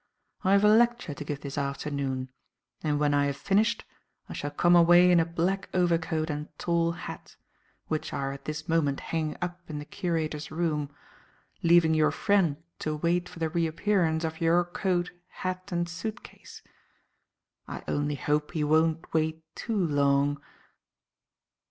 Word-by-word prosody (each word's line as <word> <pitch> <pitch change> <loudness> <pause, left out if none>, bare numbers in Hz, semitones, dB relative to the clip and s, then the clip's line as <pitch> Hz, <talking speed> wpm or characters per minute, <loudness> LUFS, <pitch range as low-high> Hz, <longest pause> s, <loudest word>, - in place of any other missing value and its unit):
I 190 0 +3
have 200 +1 +5
a - - +7
lecture 235 -6 +3
to 150 - -7
give 145 -1 -5
this 140 0 -4
afternoon, 140 -2 -3 0.5
and, 150 -2 0
when 145 -1 +2
I 145 0 +3
have 140 -1 -3
finished, 200 +8 +1 0.4
I - - -7
shall 145 - -3
come 175 +4 +3
away 175 +1 +7
in 175 - +6
a 165 - +3
black 180 +4 -1
overcoat 165 -3 +1
and 150 +1 -4
tall 170 -1 +1
hat - - -9 0.5
(which 155 -1 -2
are 135 0 -2
at 140 0 -9
this 155 +1 -5
moment 155 -4 +1
hanging 160 -2 -3
up 175 0 -4
in 150 - -4
the 145 - -6
curator's 155 -3 -3
room), 155 -3 -1 0.7
leaving 170 -1 +5
your 155 -1 +4
friend 175 -2 +2 0.2
to 155 0 -2
wait 170 +3 0
for - - -12
the 165 -1 -1
reappearance 170 0 +1
of 160 0 -4
your 170 +2 +4
coat, 175 0 -1 0.2
hat 185 +1 -5
and 175 0 0
suit 210 +6 -5
case. - - -13 1.0
I - - -7
only 145 0 -1
hope 150 +2 -1
he 155 -3 0
won't 160 +2 +1
wait 160 0 0
too 225 -2 -3
long." 145 -4 +2
160 Hz, 160 wpm, -28 LUFS, 150-175 Hz, 1.0 s, a